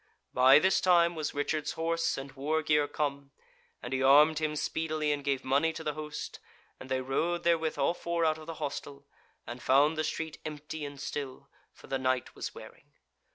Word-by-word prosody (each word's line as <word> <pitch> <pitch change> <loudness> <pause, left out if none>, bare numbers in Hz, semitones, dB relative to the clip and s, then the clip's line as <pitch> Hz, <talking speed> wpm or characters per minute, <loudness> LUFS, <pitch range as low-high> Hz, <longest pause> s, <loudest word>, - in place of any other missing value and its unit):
By 130 +2 +7
this 190 +5 +3
time 175 -2 +4
was 155 -4 -4
Richard's 150 +1 -1
horse 165 0 -1
and 135 0 -7
war 150 +4 -1
gear 150 -1 +2
come, 140 -1 -3 0.5
and 125 - -5
he 130 - 0
armed 150 +3 +6
him 155 -1 -1
speedily 155 0 -1
and 145 -1 -2
gave 140 -2 -1
money 140 +5 +2
to 160 - -7
the 150 - -2
host, 150 0 -6 0.4
and 130 - -10
they 130 0 0
rode 170 +7 -1
therewith 165 -2 +1
all - - +2
four 170 -1 -1
out 155 0 +1
of 155 - -12
the 165 - -5
hostel, 140 -2 -6 0.4
and 120 +2 -7
found 145 +4 +4
the - - +1
street 160 0 -4
empty 150 0 -6
and 140 -1 -8
still, 140 -1 -6 0.2
for - - -17
the 135 - -2
night 130 -1 -1
was - - -6
wearing. - - -13
150 Hz, 195 wpm, -30 LUFS, 140-160 Hz, 0.5 s, By